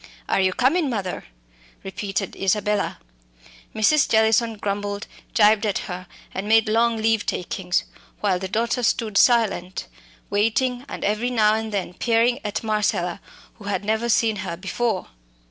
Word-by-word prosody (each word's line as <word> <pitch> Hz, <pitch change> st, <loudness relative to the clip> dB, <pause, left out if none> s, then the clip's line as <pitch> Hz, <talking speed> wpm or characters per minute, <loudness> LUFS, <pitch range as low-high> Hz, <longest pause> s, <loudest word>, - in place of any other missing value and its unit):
"Are -, -, +2 dB
you 190 Hz, 0 st, +3 dB
comin', 280 Hz, -, +2 dB
mother?" 200 Hz, -7 st, -3 dB, 0.6 s
repeated 195 Hz, 0 st, -4 dB
Isabella. 210 Hz, +1 st, 0 dB, 0.8 s
Mrs. 275 Hz, +7 st, +3 dB
Jellison 220 Hz, +1 st, +3 dB
grumbled, 205 Hz, 0 st, -3 dB, 0.3 s
gibed 215 Hz, 0 st, +5 dB
at 205 Hz, -3 st, 0 dB
her, 180 Hz, 0 st, -6 dB, 0.3 s
and 195 Hz, +2 st, -4 dB
made 225 Hz, 0 st, +4 dB
long 230 Hz, +1 st, +2 dB
leave 220 Hz, -1 st, +1 dB
takings, 180 Hz, 0 st, -1 dB, 0.4 s
while 190 Hz, -3 st, +1 dB
the 190 Hz, -, -4 dB
daughter 230 Hz, +5 st, 0 dB
stood 225 Hz, -2 st, 0 dB
silent, 200 Hz, -6 st, +2 dB, 0.5 s
waiting, 245 Hz, +5 st, +1 dB
and -, -, -6 dB
every 215 Hz, +4 st, 0 dB
now 215 Hz, -3 st, +3 dB
and 220 Hz, 0 st, -2 dB
then 195 Hz, -3 st, -3 dB
peering 235 Hz, +4 st, +2 dB
at 210 Hz, +1 st, -3 dB
Marcella, 205 Hz, -4 st, 0 dB, 0.4 s
who 205 Hz, -, -11 dB
had 200 Hz, -1 st, -2 dB
never 220 Hz, +2 st, 0 dB
seen 220 Hz, -1 st, +2 dB
her 185 Hz, -4 st, -4 dB
before. 200 Hz, +2 st, -2 dB
215 Hz, 145 wpm, -23 LUFS, 195-230 Hz, 0.8 s, gibed